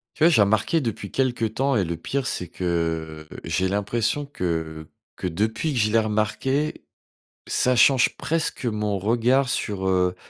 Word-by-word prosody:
Tu - - -1
vois, 170 - +8
j'ai 150 - +4
remarqué 110 +10 +2
depuis 115 -7 -4
quelque 125 -3 0
temps 135 +5 0
et 105 - +2
le 85 -1 -3
pire 135 +10 -2
c'est 90 - -3
que, 80 -3 -3 0.2
j'ai 95 0 0
l'impression 105 +8 -1
que 80 - -3 0.3
que - - -4
depuis 110 - -1
que 125 - 0
je 105 0 +2
l'ai 115 - +4
remarqué, 110 +7 -1 0.6
ça 125 0 +2
change 130 +1 +4
presque 160 -4 -1
mon 105 -3 -1
regard 120 +6 +2
sur, 100 -6 -2
heu, 90 -1 +2
110 Hz, 165 wpm, -24 LUFS, 90-130 Hz, 0.6 s, vois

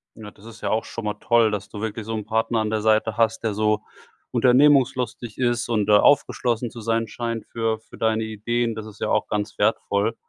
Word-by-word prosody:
Ja, 110 -2 -10
das 100 - -19
ist 115 0 -12
ja - - -2
auch 110 0 0
schon 115 - -7
mal 105 - -1
toll, 115 0 +3
dass 105 -1 -4
du 105 - -8
wirklich 110 0 -4
so 115 - -4
'n 105 -2 -4
Partner 110 +1 0
an 110 -1 -1
der 110 0 -1
Seite 110 0 +2
hast, 115 -1 +1
der 110 -2 0
so 105 0 +1 0.5
unternehmungslustig 125 -4 +3
ist 120 -1 0
und 110 -3 +1
der 105 -1 +5
aufgeschlossen 120 -4 +2
zu 115 - -9
sein 115 +1 0
scheint 115 +1 -4
für 115 -1 -1
für 110 - -16
deine 110 0 +1
Ideen. 115 +2 -2
Das 110 -1 -6
ist 110 -2 -12
ja - - -2
auch - - +1
ganz 105 0 -3
wertvoll. 100 +3 +1
110 Hz, 220 wpm, -23 LUFS, 105-115 Hz, 0.5 s, der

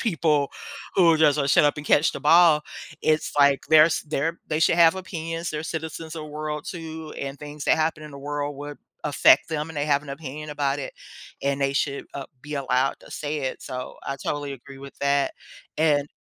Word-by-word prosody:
people 155 -8 +1 0.4
who 170 -3 +6
are 160 - +2
just, 150 -2 +5
like, 140 -1 +1
"Shut - - +5
up 145 - +1
and 150 - -7
catch 150 - +4
the - - -6
ball," 160 0 +6 0.4
it's 155 0 +1
like 140 -1 +5
there's 155 0 +6
there 155 +2 -2
they 155 0 -1
should 165 - +4
have 165 0 +6
opinions, 165 -3 -4
they're 150 0 -3
citizens 160 0 -5
of 155 - -5
world 150 0 -5
too, 160 -3 -7
and 140 0 -5
things 150 0 -8
that - - +4
happen 155 0 0
in 150 - -9
the 140 - -9
world 145 0 -4
would 145 0 -8 0.3
affect 145 +1 +5
them, 155 0 -2
and 155 - -10
they 145 - 0
have 145 0 +2
an 145 - -13
opinion 150 +1 -7
about 145 -1 -1
it, 130 - -6 0.5
and 140 0 -1
they 135 0 +1
should, 140 0 -1
uh, 140 -1 -5 0.2
be 150 0 -6
allowed 135 -1 +1
to - - -16
say 150 0 -3
it, 130 - -4
so 125 0 -6
I 140 - -3
totally 145 +1 -3
agree 135 +1 -11
with 140 0 -12
that, 140 0 +1 0.5
and 145 -2 +2
150 Hz, 210 wpm, -24 LUFS, 140-160 Hz, 0.5 s, who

